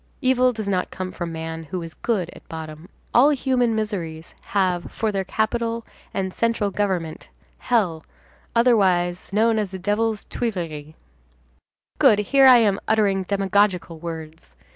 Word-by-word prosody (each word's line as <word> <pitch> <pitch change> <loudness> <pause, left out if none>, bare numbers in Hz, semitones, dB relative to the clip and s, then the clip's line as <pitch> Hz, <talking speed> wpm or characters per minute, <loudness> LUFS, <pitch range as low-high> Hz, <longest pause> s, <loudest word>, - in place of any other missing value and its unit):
Evil 255 -2 +3
does 215 -3 -5
not 185 -2 0
come 185 -1 -5
from 175 -2 -5
man, 160 0 -5
who 175 +3 -5
is 165 -1 -8
good 190 -8 -2
at - - -16
bottom. 160 +1 -8 0.2
All 265 +5 +6
human 255 -5 +1
miseries 175 -7 -4
have 185 -3 -1
for 220 -1 -1
their 195 -1 -1
capital 230 +3 -1 0.3
and 190 -1 -3
central 230 -3 0
government 185 -6 -2 0.3
hell, 190 -10 0 0.5
otherwise, 190 -8 +2
known 220 +2 +3
as 210 -2 -1
the 190 - -6
Devil's 210 +3 -1
Tuileries. 165 -9 -4 1.0
Good, 210 - +6
here 270 +6 +4
I 255 -1 +9
am 205 -4 +2
uttering 200 -3 +2
demagogical 195 -4 +1
words! 160 - -8
195 Hz, 140 wpm, -23 LUFS, 170-225 Hz, 1.0 s, I